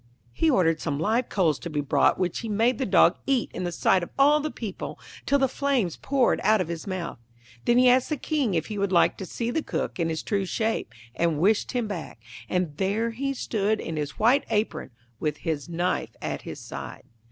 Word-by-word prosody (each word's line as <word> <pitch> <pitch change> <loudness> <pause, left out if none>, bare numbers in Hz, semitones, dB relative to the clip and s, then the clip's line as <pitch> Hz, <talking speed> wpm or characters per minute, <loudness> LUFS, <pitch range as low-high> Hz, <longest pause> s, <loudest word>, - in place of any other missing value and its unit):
He 325 - +2
ordered 165 - +3
some 145 -3 -2
live 225 +9 +1
coals 165 -8 +1
to 170 - -6
be 150 -2 -2
brought, 140 -2 +3
which 180 -2 -1
he 230 - -5
made 230 +5 +2
the 265 - 0
dog - - +5
eat 270 -3 +1
in 185 - -3
the 175 - -2
sight 185 +2 +2
of 175 - -5
all 290 +2 +5
the 305 +1 -2
people 215 -9 -6 0.3
till 280 - +4
the 270 -1 +3
flames 260 - 0
poured 270 -3 +1
out 215 +2 +4
of 180 -3 -2
his 170 +1 -5
mouth. 185 -9 -4 0.5
Then 240 - +4
he 250 0 +6
asked 250 +1 +4
the 305 - -1
King 270 - 0
if 160 -1 0
he 210 -2 -5
would 200 -1 0
like 175 - +4
to 190 - -5
see 235 +5 -3
the 320 - 0
Cook - - -3
in 165 -1 +1
his 160 -1 -3
true 200 -2 0
shape, 220 - -1 0.2
and 165 0 +1
wished 205 - +2
him 245 -3 0
back, 175 - -6 0.3
and 180 -5 -1
there 210 +5 0
he 275 +4 -2
stood 215 -3 0
in 165 - -4
his 145 -2 -4
white 250 +6 +4
apron, 210 -10 -1 0.3
with 150 -1 -1
his 160 0 -3
knife 175 +2 -1
at - - -4
his - - -8
side. - - -8
205 Hz, 220 wpm, -26 LUFS, 170-245 Hz, 0.5 s, he